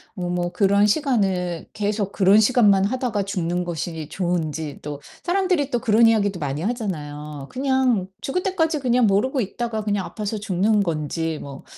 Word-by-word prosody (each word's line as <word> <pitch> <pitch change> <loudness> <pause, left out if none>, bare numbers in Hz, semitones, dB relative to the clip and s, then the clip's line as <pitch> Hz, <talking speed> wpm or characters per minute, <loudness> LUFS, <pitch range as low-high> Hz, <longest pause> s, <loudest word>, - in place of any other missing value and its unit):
어 185 - -6
뭐 175 0 -1
그런 200 0 +3
시간을 195 - 0
계속 205 -1 -1
그런 200 +2 +5
시간만 205 -4 +4
하다가 240 -3 -1
죽는 180 -2 -2
것이 160 -2 -4
좋은지 160 -5 -2
또 145 -1 -6 0.2
사람들이 360 -6 +1
또 240 - 0
그런 225 +1 +4
이야기도 205 -5 +2
많이 145 +1 -3
하잖아요. 150 - -4
그냥 260 -7 +1
죽을 360 +7 -1
때까지 325 -5 0
그냥 250 -2 +2
모르고 240 +7 +2
있다가 220 +1 -3
그냥 205 -2 -1
아파서 215 0 -4
죽는 205 +1 +1
건지 160 -1 -2
뭐 140 -1 -9
200 Hz, 340 characters per minute, -22 LUFS, 175-240 Hz, 0.2 s, 그런